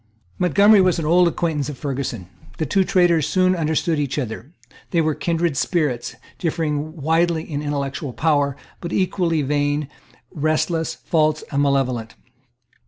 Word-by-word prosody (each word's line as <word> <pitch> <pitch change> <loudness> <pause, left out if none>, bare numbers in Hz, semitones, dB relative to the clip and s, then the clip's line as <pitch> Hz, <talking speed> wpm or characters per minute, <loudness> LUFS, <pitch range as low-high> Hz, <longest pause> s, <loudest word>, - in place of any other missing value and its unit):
Montgomery 200 +4 +5
was 185 -2 +3
an 165 - -2
old 175 +3 +5
acquaintance 160 -4 -1
of 145 - -7
Ferguson. 130 - -4 0.3
The 160 - -1
two 190 +7 +2
traitors 175 -5 +3
soon 185 +3 +2
understood 160 0 0
each 145 -1 -2
other. 125 +1 -5 0.4
They 170 - +1
were 155 -1 +2
kindred 170 -1 -1
spirits, 150 -9 -1 0.2
differing 155 -2 -2
widely 165 +2 +1
in 150 -4 -4
intellectual 140 -1 -3
power, 140 +1 +1 0.2
but 170 - -6
equally 175 -4 0
vain, 145 +1 0 0.4
restless, 155 +2 0
false 155 -1 0
and 140 -1 +1
malevolent. 130 -5 0
155 Hz, 140 wpm, -21 LUFS, 140-170 Hz, 0.4 s, Montgomery